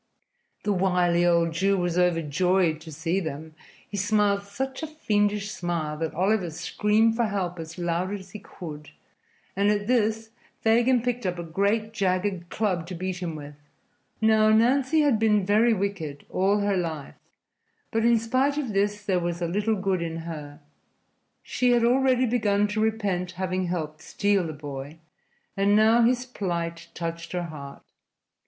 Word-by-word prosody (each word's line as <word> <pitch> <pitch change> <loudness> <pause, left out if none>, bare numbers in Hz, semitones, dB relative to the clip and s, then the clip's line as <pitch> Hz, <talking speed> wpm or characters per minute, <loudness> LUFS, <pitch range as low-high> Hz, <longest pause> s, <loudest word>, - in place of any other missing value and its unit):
The 205 - +1
wily 180 -2 +2
old 170 -1 +3
Jew 195 +4 +2
was 175 -2 -1
overjoyed 175 0 +2
to 160 - -10
see 165 +5 -1
them. 160 -2 -6 0.3
He 205 - -6
smiled 205 0 +2
such 260 +8 -5
a 315 - -3
fiendish 210 -8 0
smile 170 -5 -3
that 160 -1 -3
Oliver 190 +1 +1
screamed 210 +7 +1
for 235 0 +1
help 185 -4 -2
as 160 +1 -8
loud 175 +2 -1
as 195 -2 -7
he 210 - -8
could, 155 -6 -9 0.7
and 200 +2 +2
at 205 -1 +1
this 225 -1 +1 0.3
Fagin 235 +2 +3
picked 245 -4 -1
up 180 -1 -2
a 170 - -4
great 200 +6 0
jagged 185 -2 -1
club 185 -6 -1
to 185 - -6
beat 185 +1 -4
him 170 -3 -3
with. 145 -1 -8 0.7
Now, 220 -1 +4
Nancy 260 +7 +3
had 280 -7 +3
been 210 -3 +3
very 215 +4 +4
wicked 190 -9 -3
all 200 +3 +2
her 200 -1 +1
life, 160 -5 -4 0.7
but 225 0 0
in 235 0 +5
spite 255 +6 +1
of 260 -8 -2
this 205 +1 0
there 190 -4 +1
was 170 0 -3
a 170 - -1
little 205 +5 0
good 190 -2 -1
in 165 -1 -4
her. 150 -3 -8 0.8
She 250 -1 +1
had 240 -1 +3
already 255 +1 +3
begun 210 -4 +2
to 215 +1 -1
repent 200 -5 -1
having 185 0 -2
helped 155 -3 -4
steal 200 -4 0
the 155 - -5
boy, 145 0 -7 0.6
and 200 +1 +3
now 220 +2 +5
his 245 +1 +2
plight 170 -8 -4
touched 170 0 -5
her 180 -1 -1
heart. 145 -4 -9
195 Hz, 165 wpm, -26 LUFS, 170-220 Hz, 0.8 s, in